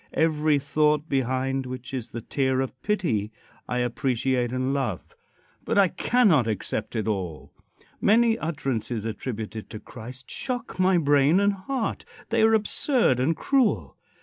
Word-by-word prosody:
Every 155 -2 +2
thought, 150 +2 +1
behind 130 0 -1
which 125 0 -7
is 125 -4 -4
the 115 - -6
tear 130 +2 0
of 130 -1 -4
pity, 150 - 0 0.4
I 125 - -1
appreciate 125 0 0
and 130 +1 -1
love. 130 -10 -3 0.5
But - - -1
I 195 -3 +5
cannot 180 - +3
accept 110 +1 -2
it 110 -1 -1
all. 95 -7 -4 0.5
Many 225 +2 +4
utterances 130 -8 -3
attributed 110 -1 -5
to 110 - -7
Christ 125 +4 -10
shock 245 -7 -4
my 185 0 +4
brain 145 +2 +4
and 200 0 +3
heart. 225 +5 -3 0.3
They - - +2
are 220 0 +5
absurd 220 - +2
and 155 +5 +1
cruel. 210 - +1
135 Hz, 145 wpm, -25 LUFS, 120-180 Hz, 0.5 s, I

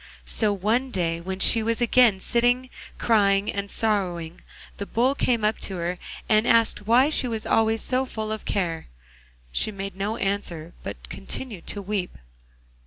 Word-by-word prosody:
So 215 -2 +2
one 220 +7 0
day, 170 -6 -1
when 190 +2 -5
she 225 - +7
was 230 +1 -1
again 240 -4 +4
sitting 245 +4 +1 0.3
crying 200 -3 +2
and 200 0 -4
sorrowing, 180 -7 -1 0.4
the 200 - -5
Bull 250 +4 +2
came 240 -5 0
up 215 +1 0
to 195 - -2
her 175 +1 -3 0.3
and 215 +2 +3
asked 230 -2 +2
why 255 +6 +5
she 265 - +3
was 225 -1 -4
always 225 0 +2
so 260 0 0
full 215 -3 -5
of 220 - -4
care? 170 -5 -2 0.6
She 215 - +1
made 195 -1 -6
no 205 +4 -2
answer, 175 -5 -3
but - - -7
continued 170 - -6
to 205 - -4
weep. 195 -2 -3
210 Hz, 165 wpm, -24 LUFS, 190-230 Hz, 0.6 s, she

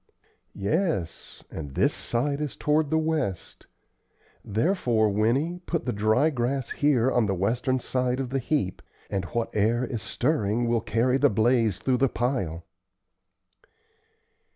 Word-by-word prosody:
"Yes; 100 - -2
and 70 -4 -7
this - - +2
side 140 +5 -2
is 150 -3 -3
toward 150 0 +1
the 160 - +2
west; 155 - -2 0.8
therefore, 115 - +1
Winnie, 130 - 0
put 165 -2 -2
the 125 - -1
dry 110 +9 +2
grass 130 0 -2
here 135 -4 +2
on 120 -3 +2
the 100 - 0
western 120 +7 0
side 125 0 -1
of 130 -2 -3
the 135 - 0
heap, 125 -8 -1 0.3
and 95 -1 -1
what 115 +4 -3
air 115 +4 +2
is 120 -4 -4
stirring 120 -4 0
will 115 -1 +1
carry 125 +4 +1
the - - +5
blaze 110 -2 +2
through 125 +6 0
the 135 +1 +2
pile." 105 - -2
120 Hz, 140 wpm, -26 LUFS, 110-140 Hz, 0.8 s, the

